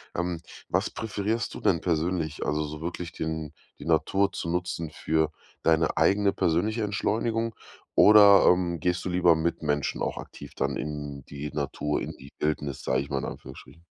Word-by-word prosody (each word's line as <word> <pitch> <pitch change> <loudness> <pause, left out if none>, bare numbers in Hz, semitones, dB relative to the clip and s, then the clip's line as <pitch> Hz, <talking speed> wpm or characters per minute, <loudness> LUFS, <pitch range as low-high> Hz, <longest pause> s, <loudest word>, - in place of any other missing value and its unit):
Ähm, 90 -1 -1 0.3
was - - 0
präferierst 110 0 -2
du - - -7
denn 85 -4 +2
persönlich? 80 -2 -1
Also 75 +1 0
so 75 +1 -7
wirklich 85 0 -4
den 80 -2 -4 0.3
die - - -9
Natur 100 0 +2
zu 85 - -4
nutzen 85 -2 -2
für 80 0 0 0.3
deine 80 0 +2
eigene 100 0 +3
persönliche 105 +7 +1
Entschleunigung 115 +2 -1 0.4
oder, 100 -2 +8
ähm, 90 -2 +3
gehst 90 +2 0
du - - -1
lieber 90 -1 +4
mit 80 +2 -1
Menschen 75 -2 -1
auch - - -2
aktiv - - -10
dann - - -1
in 75 -2 -5
die 70 +1 -6
Natur, 75 0 -2
in - - -4
die 70 +1 -13
Wildnis, 75 -2 -2
sage 65 - +1
ich 70 - -7
mal, 70 - -1
in - - -4
Anführungsstrichen? 75 +6 -10
85 Hz, 170 wpm, -27 LUFS, 75-95 Hz, 0.4 s, oder